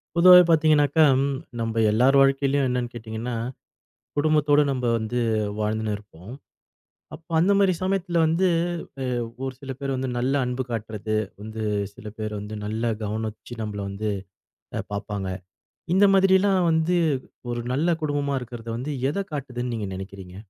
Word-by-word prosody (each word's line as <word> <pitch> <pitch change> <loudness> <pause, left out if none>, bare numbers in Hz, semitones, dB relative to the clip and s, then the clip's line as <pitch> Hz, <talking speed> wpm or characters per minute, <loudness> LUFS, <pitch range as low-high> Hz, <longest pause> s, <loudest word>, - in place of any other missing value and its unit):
பொதுவாவே 180 +1 +9
பார்த்தீங்கன்னாக்கா, 155 -1 +4 0.6
நம்ம 115 0 0
எல்லார் 125 +6 +4
வாழ்க்கையிலும் 135 0 +3
என்னன்னு 125 -1 -1
கேட்டீங்கன்னா, 115 +1 -5 0.8
குடும்பத்தோடு 150 -1 +4
நம்ம 130 -2 -3
வந்து 115 +2 -2 0.4
வாழ்ந்துன்னு 110 0 -1
இருப்போம். 100 -1 -14 0.8
அப்போ 165 +1 -12
அந்த 180 +5 +4
மாதிரி 195 -2 +4
சமயத்துல 185 -2 0
வந்து 165 +4 +2 0.6
அ, - - -2 0.4
ஒரு 130 -1 -4
சில 135 -2 -8
பேர் 135 -1 -2
வந்து 130 0 -2
நல்ல 130 +3 0
அன்பு 125 +1 -2
காட்டுறது 110 -1 -3 0.3
வந்து, 110 +1 -5 0.3
சில 110 - -12
பேர் 110 -1 -3
வந்து 105 +1 -7
நல்ல 110 +2 -1
கவனிச்சு 110 +2 -5
நம்மள 105 -1 -4
வந்து 105 +2 -3 0.7
அ, - - 0
பாப்பாங்க. 100 -2 -3 0.6
இந்த 195 +2 +6
மாதிரி 190 0 +5
எல்லாம் 195 -1 +2
வந்து 160 +2 +2 0.5
ஒரு 120 0 -2
நல்ல 155 +6 +1
குடும்பமா 145 -2 0
இருக்குறது 120 -1 -8
வந்து 130 +5 -4 0.2
எதைக் 195 +4 -3
காட்டுதுன்னு 125 -4 -4
நீங்க 105 -3 -3
நினைக்கிறீங்க? 95 -1 -9
125 Hz, 140 wpm, -24 LUFS, 110-155 Hz, 0.8 s, பொதுவாவே